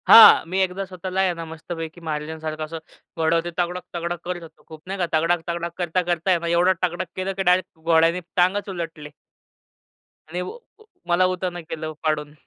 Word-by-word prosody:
हां, 225 - +10
मी 190 +2 0
एकदा 190 +1 0
स्वतःला 185 0 -5
आहे 185 -2 +2
ना 165 -1 -6
मस्तपैकी 165 +1 -7
महाराजांसारखं 155 0 -4
असं 165 +1 -6 0.4
घोडं 165 +1 +3
ते, - - -2
तगडक-तगडक 175 -1 -3
करत 180 0 -3
होतो. 155 -2 -15
खूप 155 -1 -11
नाही 195 +1 -3
का, 180 - +2
तगडक-तगडक 170 +1 0
करता-करता 175 0 0
आहे 175 - +4
ना 170 - -4
एवढं 175 +2 +4
टगडक 175 0 -1
केलं, 190 +1 -2
की 195 0 -2
डायरेक्ट 180 -2 +2
घोड्याने 165 +1 +3 0.2
टांगच 190 +3 +2
उलटले. 165 -5 -6 1.2
आणि 175 +2 -3
व - - -4 0.3
व - - -17 0.2
मला 175 +1 +4
उतावनं 180 -1 -2
केलं 155 -1 -4
पाडून. 150 -1 -1
170 Hz, 175 wpm, -23 LUFS, 160-180 Hz, 1.2 s, हां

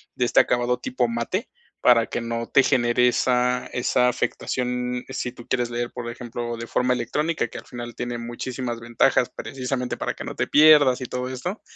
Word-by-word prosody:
de 125 - +1
este - - +4
acabado 120 0 0
tipo 125 -1 -1
mate, 120 - -2 0.3
para 115 -2 +5
que - - -3
no 115 0 -4
te 135 - +5
genere 125 -2 +3
esa 125 0 +1
esa 125 0 +2
afectación. 125 0 -2
Si 130 -2 -3
tú 120 -1 -13
quieres 120 -2 0
leer, 120 0 -3
por 120 -1 -6
ejemplo, 120 0 -5
de 115 - -6
forma 125 +2 +1
electrónica, 150 +7 -1
que - - -8
al - - -14
final 120 -1 -7
tiene 120 0 -4
muchísimas 120 0 -5
ventajas, 120 0 +2
precisamente 125 -1 -3
para - - -3
que - - -7
no - - -6
te - - -1
pierdas 150 -4 +6
y 125 - -3
todo 125 +1 -4
esto, 175 - -5
125 Hz, 190 wpm, -24 LUFS, 120-125 Hz, 0.3 s, pierdas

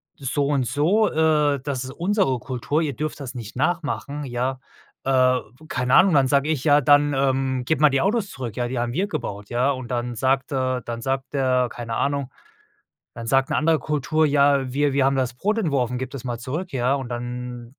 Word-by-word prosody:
so 140 +1 -1
und 140 -3 +1
so, 190 - +2
äh, 150 -3 +2
das 140 -3 -3
ist 130 - -7
unsere 170 - 0
Kultur. 130 +6 -2
Ihr 145 -4 -1
dürft 155 0 -4
das 130 -2 -7
nicht 115 -2 -8
nachmachen.“ 150 -1 -2
Ja, 130 +1 -2 0.5
äh, 130 -1 +3 0.3
keine 125 0 -1
Ahnung, 185 -2 +6
dann 135 -2 +4
sage 140 +2 +2
ich: 150 -5 -1
„Ja, 145 -1 +5
dann, 145 +1 +4
ähm, 135 -1 0
gebe 155 +1 0
mal 150 - +7
die 135 0 +1
Autos 200 0 0
zurück, 125 - -6
ja, 120 0 0
die 125 -1 -3
haben 120 0 -2
wir 190 +6 0
gebaut, 100 - -5
ja.“ 125 +4 +1
Und 130 -2 -5
dann 120 0 -2
sagt, 135 +3 0
äh 130 -2 -1
dann 115 0 -5
sagt 135 +2 -3
er 130 -2 +2
keine 115 -2 -5
Ahnung, 140 -1 -1 0.8
dann 115 -1 -7
sagt 135 +2 +2
'ne - - +1
andere 160 0 +3
Kultur: 155 +1 0
„Ja, 140 -2 +3
wir 145 0 +1
wir 135 -1 +2
haben 135 0 +2
das 125 -2 -1
Brot 210 - -1
entworfen, 130 - 0
gib 130 -1 -4
das 135 -3 -8
mal 120 -2 -3
zurück.“ 155 +9 -5
Ja, 130 +1 +1
und 135 -3 -4
dann 120 0 -6
135 Hz, 210 wpm, -23 LUFS, 125-145 Hz, 0.8 s, mal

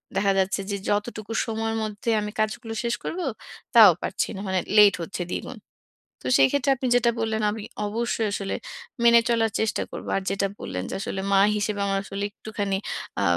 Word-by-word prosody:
দেখা 195 +1 +3
যাচ্ছে 190 +1 +1
যে 200 - -1
যতটুকু 215 +1 -2
সময়ের 225 0 -2
মধ্যে 215 +1 -4
আমি 210 0 -4
কাজগুলো 225 +1 -1
শেষ 235 0 0
করব, 350 - -4 0.6
তাও - - +10
পারছি - - -1
না। - - -6
মানে 190 -1 +1 0.2
লেট 205 -2 +8
হচ্ছে 180 +2 -5
দ্বিগুণ। - - -5 0.6
তো - - -4
সেইক্ষেত্রে 275 - +3
আপনি 260 0 -3
যেটা 235 -1 +4
বললেন 220 -1 -1
আমি 215 0 -6 0.2
অবশ্যই 225 0 -1
আসলে 200 -1 -2 0.5
মেনে 235 0 +7
চলার 225 -2 +2
চেষ্টা 220 0 0
করব। - - -7
আর - - -1
যেটা 195 0 0
বললেন 90 0 -4
যে - - -5
আসলে 190 -1 -3
মা 195 - +5 0.2
হিসেবে 210 0 -1
আমার 195 - +1
আসলে 195 +1 -5
একটুখানি 205 -2 -3 0.4
আ - - +1
210 Hz, 180 wpm, -25 LUFS, 195-225 Hz, 0.6 s, তাও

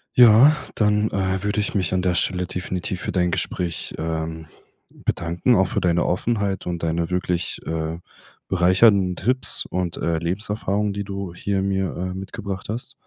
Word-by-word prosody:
Ja 125 +5 +8 0.2
dann, 105 0 +2
äh, 95 0 -1
würde 105 +1 0
ich 105 - -2
mich 95 -3 0
an 95 - +1
der 90 -1 +1
Stelle 90 +1 +1
definitiv 90 0 -4
für - - -3
dein 90 -1 +1
Gespräch, 85 -1 -2
ähm, 80 0 -4 0.4
bedanken, 85 +8 0
auch 95 0 +3
für - - -2
deine 85 -1 +2
Offenheit 100 0 -1
und 85 -1 -3
deine 85 0 -1
wirklich, 90 -1 -1
äh, 80 +1 -3 0.5
bereichernden 95 +1 +4
Tipps 125 +9 +2
und, 90 -2 -3
äh, 85 0 0
Lebenserfahrung, 100 +3 -1
die 100 0 -3
du 100 -3 -5
hier 100 +1 -1
mir, 95 -1 -1
äh, 90 +1 -3
mitgebracht 95 +1 -6
hast. 120 +5 -4
95 Hz, 160 wpm, -22 LUFS, 85-100 Hz, 0.5 s, Ja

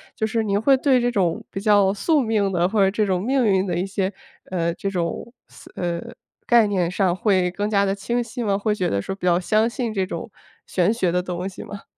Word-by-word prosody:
就 220 - -1
是 225 +1 0
您 200 -1 0
会 270 +4 +5
对 260 -1 +3
这 245 0 +1
种 180 -7 0
比 195 - -5
较 205 -2 +4
宿 295 - +1
命 215 -4 0
的 175 -1 +2
或 210 +3 -1
者 190 - +4
这 210 +1 0
种 185 -2 0
命 260 +2 +1
运 190 -2 +2
的 175 -2 -1
一 180 - -1
些 195 -1 -2 0.4
呃， 170 -2 0
这 195 - -4
种 180 +5 -3 0.2
似 - - -16
呃， 170 -1 -2 0.5
概 235 -2 +6
念 185 -4 0
上 185 -2 +1
会 185 -2 +2
更 205 +3 -2
加 200 -2 +2
地 195 - 0
清 240 +5 -2
晰 240 +1 -6
吗？ 200 -3 +1
会 210 +1 0
觉 185 -4 -1
得 100 - 0
说 195 - -4
比 190 - -7
较 175 0 +4
相 215 +5 +2
信 235 -2 -3
这 190 -3 0
种 185 +4 -6 0.3
玄 180 +2 +1
学 190 -7 0
的 180 +1 +1
东 180 0 -4
西 195 - -8
吗？ 205 -1 -9
200 Hz, 260 characters per minute, -22 LUFS, 180-220 Hz, 0.5 s, 概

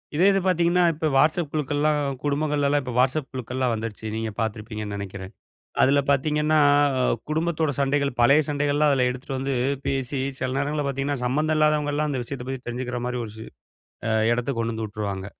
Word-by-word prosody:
இதே 175 +5 +4
இது 195 - +2
பாத்தீங்கன்னா 175 0 +3
இப்ப 155 +1 -2
WhatsApp 155 +3 +3
குழுக்கள்லாம் 150 0 +1 0.2
குடும்பங்கள்லலாம் 145 0 +1
இப்ப 125 -2 -5
WhatsApp 135 +2 +2
குழுக்கள்லாம் 125 -1 -2
வந்துருச்சு, 110 -1 -5
நீங்க 110 -1 -3
பாத்துருப்பீங்கன்னு 110 -1 -4
நெனக்கிறேன். 95 -1 -7 0.5
அதுல 140 +2 +4
பாத்தீங்கன்னா, 150 +2 +2 0.7
குடும்பத்தோட 160 -1 0
சண்டைகள், 140 0 +1
பழய 140 +6 +6
சண்டைகள்லாம் 145 +1 +2
அதுல 125 -2 +2
எடுத்துட்டு 130 +1 -5
வந்து 135 0 -1 0.3
பேசி, 135 0 -1 0.2
சில 130 - -1
நேரங்கள்ல 145 +1 -1
பாத்தீங்கன்னா 135 -1 -2
சம்மந்தம் 155 +5 +1
இல்லாதவங்கலாம் 150 -1 +1
அந்த 130 - -2
விஷயத்த 125 -1 -6
பத்தி 135 -1 -4
தெரிஞ்சுக்குற 125 0 -3
மாரி 125 0 -2
ஒரு 105 - -8
ஷி 110 - -8 0.6
அ 110 - +1 0.2
எடத்துக் 120 +1 -2
கொண்டு 115 0 -1
வந்து 110 -1 -3
உட்ருவாங்க. 100 -2 -4
135 Hz, 160 wpm, -24 LUFS, 120-150 Hz, 0.7 s, பழய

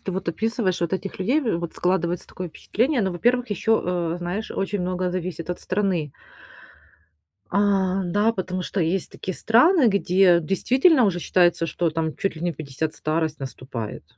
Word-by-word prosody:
ты 190 - -4
вот 190 -2 -4
описываешь 220 -1 -1
вот 170 +1 -1
этих 190 0 -3
людей, 250 +11 +2
в 220 - -1
вот 170 -1 -5
складывается 180 -1 -1
такое 180 -1 -6
впечатление, 250 - 0
но, 190 - 0
во-первых, 240 +6 +1
еще, 220 +2 +1
э, 175 -1 -1
знаешь 180 +5 -4
очень 195 0 -2
много 180 0 -1
зависит 175 -2 -4
от 180 - -3
страны. 185 -7 -1 1.4
А. 195 -1 +2
Да, 205 +6 +2
потому 185 -2 -3
что 190 - -3
есть 170 +3 0
такие 185 - -5
страны, 260 +5 +5
где 185 -3 +4
действительно 255 - +3
уже 175 -3 0
считается, 175 -2 +2
что 170 0 -1
там 160 -1 -2
чуть 195 - -1
ли 160 - -8
не 175 -1 0
в - - -20
50 155 +1 -4
старость 155 0 -1
наступает. 130 - -6
185 Hz, 175 wpm, -23 LUFS, 170-205 Hz, 1.4 s, страны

